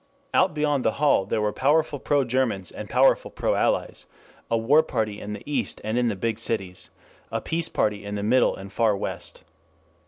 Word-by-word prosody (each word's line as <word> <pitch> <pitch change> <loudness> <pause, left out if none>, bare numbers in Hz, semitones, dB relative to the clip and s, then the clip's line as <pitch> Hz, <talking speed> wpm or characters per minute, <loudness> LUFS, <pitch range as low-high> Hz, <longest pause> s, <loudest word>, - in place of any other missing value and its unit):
Out 185 -4 +3
beyond 145 -3 +1
the 110 - +1
hall 140 -10 +2
there 110 - 0
were 105 -1 0
powerful 145 +1 +1
pro 145 +1 +1
Germans 115 -7 0
and - - -8
powerful - - +3
pro - - -1
Allies; - - -1 0.4
a 115 - +2
war 135 +8 +4
party 110 -8 -3
in 105 +1 -5
the 105 - -8
East 145 -1 -1
and 110 +2 -2
in 120 0 +2
the 110 - -1
big 110 +3 -2
cities; 95 -5 -3 0.4
a - - -1
peace 165 0 0
party 105 -1 0
in 100 0 -5
the 100 - -3
middle 125 +4 +3
and 95 +1 -10
far 110 -3 +2
West. - - -5
115 Hz, 195 wpm, -25 LUFS, 105-140 Hz, 0.4 s, war